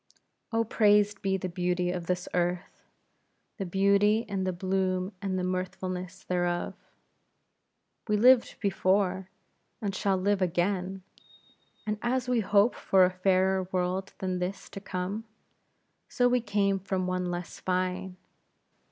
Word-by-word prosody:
Oh, 225 Hz, 0 st, +2 dB
praised 210 Hz, -2 st, +3 dB
be 190 Hz, -1 st, +1 dB
the 185 Hz, -, -4 dB
beauty 180 Hz, 0 st, -1 dB
of 175 Hz, -2 st, -5 dB
this 180 Hz, -1 st, -1 dB
earth; 175 Hz, 0 st, -2 dB, 0.7 s
the 195 Hz, -4 st, -3 dB
beauty, 200 Hz, +4 st, +3 dB
and 190 Hz, -2 st, -2 dB
the -, -, +1 dB
bloom, 185 Hz, +1 st, -1 dB
and 190 Hz, -2 st, -2 dB
the 180 Hz, -, -1 dB
mirthfulness 185 Hz, 0 st, -4 dB
thereof. 175 Hz, -1 st, -1 dB, 1.3 s
We 210 Hz, -1 st, +2 dB
lived 245 Hz, +2 st, +5 dB
before, 190 Hz, -1 st, +1 dB, 0.5 s
and 200 Hz, -2 st, -2 dB
shall 195 Hz, 0 st, +1 dB
live 200 Hz, +1 st, +1 dB
again; 185 Hz, +1 st, -1 dB, 0.8 s
and 210 Hz, -1 st, -2 dB
as 250 Hz, +1 st, 0 dB
we 250 Hz, -2 st, +2 dB
hope 205 Hz, +2 st, +3 dB
for 190 Hz, -1 st, +4 dB
a 180 Hz, -, 0 dB
fairer 185 Hz, 0 st, +2 dB
world 185 Hz, +1 st, -1 dB
than 185 Hz, -1 st, -2 dB
this 185 Hz, +2 st, -4 dB
to 195 Hz, -, -7 dB
come; 195 Hz, +3 st, -4 dB, 0.8 s
so 245 Hz, -, +2 dB
we 245 Hz, 0 st, +2 dB
came 200 Hz, -3 st, +1 dB
from 190 Hz, -1 st, -2 dB
one 185 Hz, 0 st, -1 dB
less 175 Hz, 0 st, -5 dB
fine. 185 Hz, 0 st, -2 dB
190 Hz, 135 wpm, -28 LUFS, 180-200 Hz, 1.3 s, lived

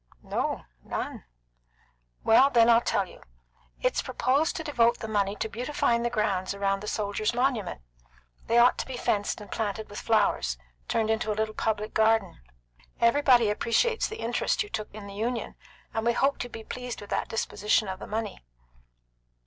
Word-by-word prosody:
"No, -, -, -2 dB, 0.2 s
none." -, -, -5 dB, 1.0 s
"Then 235 Hz, 0 st, +6 dB
I'll 230 Hz, 0 st, +6 dB
tell 205 Hz, -4 st, +1 dB
you. -, -, -15 dB, 0.6 s
It's -, -, +2 dB
proposed 280 Hz, +6 st, +1 dB
to 320 Hz, -, -3 dB
devote 240 Hz, -6 st, +3 dB
the 220 Hz, -, -6 dB
money 205 Hz, -2 st, 0 dB
to 220 Hz, -, -2 dB
beautifying 235 Hz, +1 st, 0 dB
the 240 Hz, -, 0 dB
grounds 200 Hz, -4 st, -1 dB
around 195 Hz, 0 st, 0 dB
the 210 Hz, -, -7 dB
soldiers' 210 Hz, +2 st, -1 dB
monument. 245 Hz, -, 0 dB, 0.7 s
They 230 Hz, -, +3 dB
ought 240 Hz, +1 st, +5 dB
to -, -, -3 dB
be 260 Hz, -2 st, -5 dB
fenced 205 Hz, -3 st, 0 dB
and 205 Hz, -, -11 dB
planted 215 Hz, -1 st, -3 dB
with 205 Hz, -, -6 dB
flowers 200 Hz, -, +2 dB, 0.3 s
turned 220 Hz, -1 st, +1 dB
into 220 Hz, -1 st, 0 dB
a 210 Hz, -, -3 dB
little 215 Hz, 0 st, -1 dB
public 215 Hz, -1 st, -2 dB
garden. 220 Hz, -3 st, +2 dB, 0.6 s
Everybody 240 Hz, -2 st, +5 dB
appreciates 450 Hz, -, +1 dB
the 440 Hz, -, -7 dB
interest 235 Hz, -, 0 dB
you 415 Hz, -, -11 dB
took 215 Hz, -, -4 dB
in 210 Hz, -1 st, -9 dB
the 200 Hz, -, -9 dB
Union, 230 Hz, +4 st, -2 dB, 0.4 s
and 225 Hz, -, -1 dB
we 235 Hz, +1 st, +3 dB
hoped 275 Hz, +3 st, +1 dB
you'd 245 Hz, -, -9 dB
be 225 Hz, -, -8 dB
pleased 250 Hz, +1 st, -6 dB
with 205 Hz, -, -11 dB
that -, -, -1 dB
disposition 215 Hz, -1 st, +1 dB
of 190 Hz, 0 st, -5 dB
the -, -, -8 dB
money." 215 Hz, -1 st, -4 dB
220 Hz, 175 wpm, -27 LUFS, 210-240 Hz, 1.0 s, Then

